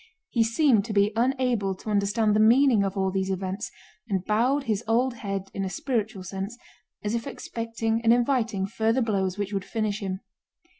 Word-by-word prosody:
He 235 - +3
seemed 230 -1 +3
to 225 - -4
be 200 0 +3
unable 240 -5 +1
to 215 +3 -6
understand 210 +1 +2
the - - +3
meaning 235 0 +5
of 195 +1 -2
all 190 -1 +1
these 190 0 -1
events, 190 +3 -3 0.4
and 190 -2 -1
bowed 250 +7 +2
his 220 -3 -1
old 245 +3 +2
head 195 -2 -4
in 195 - -2
a 190 - -2
spiritual 215 -2 -2
sense 195 +5 -5 0.5
as 210 +1 -1
if 235 -1 -2
expecting 230 0 -3
and 230 0 +4
inviting 235 -5 +2
further 225 +5 +1
blows 195 -4 0
which 205 0 -3
would 195 -1 -1
finish 215 -1 -2
him. 190 -1 -4
215 Hz, 185 wpm, -26 LUFS, 195-230 Hz, 0.5 s, meaning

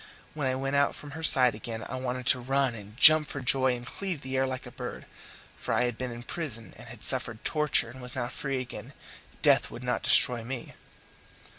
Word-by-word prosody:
When 145 -3 -2
I 130 - 0
went 135 +1 -3
out 140 0 +2
from 145 - -11
her 160 +3 -8
side 130 -6 +4
again 110 +1 -7
I - - -6
wanted 130 -1 -4
to 130 - +5
run 135 0 0
and 105 0 -12
jump 155 +2 +8
for 140 - -6
joy 130 -1 +2
and 120 0 -9
cleave 180 +1 -5
the 130 0 -5
air 130 0 +1
like 130 -1 -5
a - - -10
bird. - - -8 0.5
For - - -3
I 125 - +2
had 120 -2 -2
been 130 +1 -5
in 120 0 -9
prison 125 -8 -6
and - - -13
had - - -12
suffered 110 -2 +2
torture, 150 -6 +2
and 130 +1 -12
was 125 0 -2
now 120 -2 -2
free 135 +1 -4
again 125 -2 -8 0.5
death - - +4
would - - -10
not - - -2
destroy 120 -2 +4
me! 125 0 -7
130 Hz, 225 wpm, -28 LUFS, 120-140 Hz, 0.5 s, jump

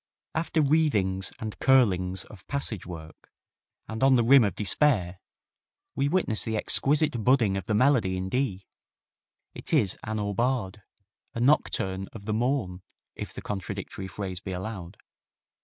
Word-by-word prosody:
After 160 -1 +1
wreathings 105 -12 +1
and 110 -1 -6
curlings 95 -8 +3
of 105 -3 -15
passage 130 -10 -2
work, 80 -3 -10 0.6
and 110 +1 -6
on 135 -1 +6
the 120 - +3
rim 130 +2 +7
of 100 -5 0
despair, 100 - +1 0.8
we 140 +1 +1
witness 155 - +1
the 110 -1 -2
exquisite 145 +1 +1
budding 120 -6 +3
of 95 -2 -4
the 110 - +1
melody 115 -7 +3
in 95 0 -3
D. 100 -4 -1 0.9
It - - -7
is 115 - +2
an 110 0 -3
aubade, 105 0 -1 0.5
a - - -2
nocturne 95 -8 +1
of 100 -3 -10
the 110 - -1
morn 110 -6 -1 0.3
if - - -7
the - - -9
contradictory 95 -1 -5
phrase 95 -1 -5
be 95 -1 -6
allowed. 95 -1 -6
110 Hz, 145 wpm, -27 LUFS, 95-130 Hz, 0.9 s, rim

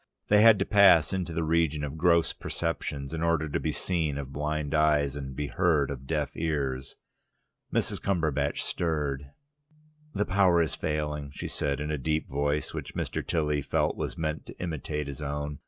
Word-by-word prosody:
They 105 0 +6
had 115 -1 +8
to 95 - 0
pass 100 -6 +6
into 90 -3 -2
the 80 0 -1
region 80 -2 +1
of 75 +1 -4
gross 85 0 +3
perceptions, 75 -4 -3
in 80 - -3
order 85 -2 +1
to 70 - -1
be 80 - -1
seen 80 -2 -1
of 70 -1 -6
blind 75 +1 -2
eyes 75 -3 +3
and 65 -2 -6
be 75 - -2
heard 75 -4 +1
of 65 -1 -7
deaf 75 -3 -1
ears. 70 -4 -2 0.8
Mrs. - - 0
Cumberbatch 80 -7 0
stirred. 75 -5 -2 0.9
"The 105 - +1
power 95 -2 +4
is 80 -2 +1
failing," 75 -1 -2
she 70 - -6
said, 70 -1 -2
in 75 +1 -3
a 75 - -2
deep 75 +3 -1
voice, 70 +2 -1
which - - -6
Mr. - - -2
Tilly 75 -3 0
felt - - 0
was - - -4
meant 80 -1 -3
to - - -10
imitate 75 -3 -3
his 70 +1 -7
own. 75 0 -4
75 Hz, 180 wpm, -28 LUFS, 70-85 Hz, 0.9 s, had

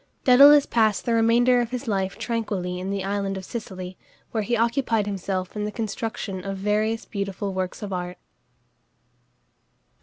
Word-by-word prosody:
Dædalus 280 +3 +8
passed 220 -3 +2
the 235 - +1
remainder 240 +2 +4
of 235 - -2
his 250 +1 -5
life 195 -3 -1
tranquilly 200 -6 -2
in 185 +1 -4
the 195 -1 -2
island 195 0 -2
of 190 - -7
Sicily, 185 -5 -7 0.3
where 220 - 0
he 235 +3 0
occupied 230 -2 +1
himself 190 -2 -3
in 210 - -2
the 210 - -2
construction 220 -3 -4
of 195 0 -4
various 215 +3 0
beautiful 200 -1 -4
works 185 +2 -3
of 200 -2 -4
art. 180 0 -4
210 Hz, 155 wpm, -24 LUFS, 190-230 Hz, 0.3 s, Dædalus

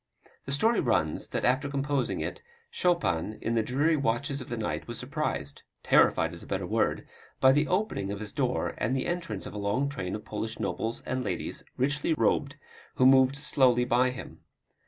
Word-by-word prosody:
The 140 - -5
story 220 +12 +3
runs, 90 - 0
that - - -2
after 130 +3 +2
composing 140 -1 -1
it, - - -4 0.3
Chopin 110 - 0
in 115 - -2
the 115 - +3
dreary 140 +8 +2
watches 140 +1 -1
of 130 - -9
the 120 - -3
night 110 - -3
was 120 -1 -5
surprised 125 - -3 0.2
terrified - - +4
is - - -7
a - - -11
better - - -2
word - - 0 0.3
by 130 - +7
the 150 +3 +2
opening 180 - -1
of 100 - -4
his 105 -1 -6
door - - -1
and 120 +5 0
the 130 - -1
entrance 170 - -3
of - - -7
a 105 - -5
long 100 +8 0
train 95 -9 -4
of 105 - -8
Polish 110 +1 -4
nobles 115 +1 -2
and 130 0 -2
ladies, 95 -6 -4
richly 145 +4 +1
robed, 115 - +1 0.4
who 130 - +3
moved 130 0 +6
slowly 130 -4 +3
by 125 +1 +3
him. 125 0 -8
130 Hz, 190 wpm, -28 LUFS, 110-145 Hz, 0.4 s, by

